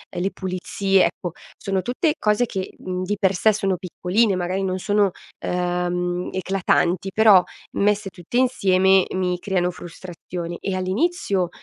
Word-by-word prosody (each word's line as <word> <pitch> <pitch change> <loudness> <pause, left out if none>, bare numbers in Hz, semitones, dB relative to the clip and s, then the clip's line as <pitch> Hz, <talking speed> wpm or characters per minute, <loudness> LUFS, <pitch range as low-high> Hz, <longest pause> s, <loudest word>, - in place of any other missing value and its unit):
le 180 +3 -1
pulizie, 190 +1 +1
ecco 175 - -3 0.3
sono 195 -1 -1
tutte 255 - 0
cose 210 +3 +2
che, 190 -5 -5
mhmm, 185 0 -4
di 205 +3 -1
per 195 -2 +3
sé 220 +5 +4
sono 195 -3 0
piccoline, 190 +4 0
magari 185 +2 -1
non 185 -1 -1
sono, 205 0 +2 0.3
ehm, 180 0 -1
eclatanti 185 -1 +1
però 215 -4 +7 0.3
messe 205 0 +1
tutte 180 +5 -5
insieme 190 -7 +4
mi 180 -1 0
creano 180 -2 0
frustrazione 175 0 -7
e 195 - -2
all'inizio 190 - 0
185 Hz, 140 wpm, -22 LUFS, 180-200 Hz, 0.3 s, però